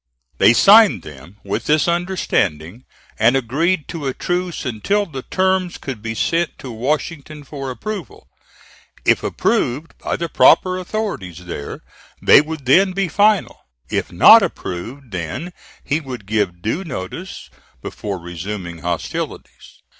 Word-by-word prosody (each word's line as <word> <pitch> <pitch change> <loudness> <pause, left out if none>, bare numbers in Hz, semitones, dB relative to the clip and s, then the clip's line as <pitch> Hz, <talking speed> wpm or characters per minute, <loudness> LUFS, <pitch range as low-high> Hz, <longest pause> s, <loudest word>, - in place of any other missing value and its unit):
They - - +7
signed 200 - +6
them 75 +7 -12
with 100 - -3
this 155 +2 +2
understanding, 130 - -1 0.3
and 115 +4 +4
agreed 150 +7 0
to 155 -5 -4
a 130 - -2
truce 175 -3 -3
until 200 - 0
the 135 -8 -7
terms 185 +2 0
could 130 -6 -7
be 110 0 -4
sent 165 +8 0
to 130 -4 -8
Washington 150 +4 -3
for 135 -1 -6
approval; 190 - -7 0.8
if - - +4
approved 145 +7 -1
by - - -2
the 170 - -3
proper 185 +2 +4
authorities 175 - -5
there, 75 -5 -6 0.4
they - - +7
would 155 -2 -7
then 185 +9 +4
be 195 -1 -1
final; 205 +4 +2 0.3
if - - -2
not - - +8
approved, 115 +8 -5
then 90 - -5 0.3
he 150 +2 0
would 130 -8 -8
give 95 -4 -1
due 150 - -1
notice, 150 - -7 0.3
before 100 -2 -5
resuming 85 0 -6
hostilities. 85 0 -5
135 Hz, 135 wpm, -19 LUFS, -, 0.8 s, not